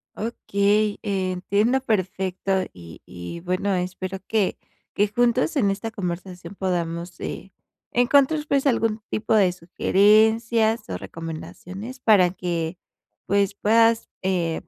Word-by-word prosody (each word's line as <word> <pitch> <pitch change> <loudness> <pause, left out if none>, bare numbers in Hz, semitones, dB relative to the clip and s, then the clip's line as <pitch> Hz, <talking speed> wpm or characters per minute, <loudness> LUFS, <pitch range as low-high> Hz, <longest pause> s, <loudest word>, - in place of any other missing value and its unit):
Okey, 210 -1 0
eh, 190 -3 -1
entiendo 205 +8 +1
perfecto, 190 -4 -2 0.2
y 85 -3 -12
y, 90 - -8
bueno, 185 +3 -1
espero 185 +1 -4
que 215 -4 +1 0.4
que 205 +1 +2
juntos 245 +7 +1
en 205 -8 +3
esta 205 +3 -4
conversación 180 -2 -6
podamos, 175 -2 -3
eh, 195 - -6 0.4
encontrar, 280 +5 +3
pues, 280 0 +2
algún 225 -3 +1
tipo 215 +1 -1
de 190 -4 +4
sugerencias 220 - +3
o 90 - -3
recomendaciones 170 - -8
para 190 -5 +5
que, 175 -2 -3 0.5
pues, 200 -1 +1
puedas, 225 +2 +3
eh, 175 -4 0
195 Hz, 120 wpm, -23 LUFS, 180-225 Hz, 0.5 s, para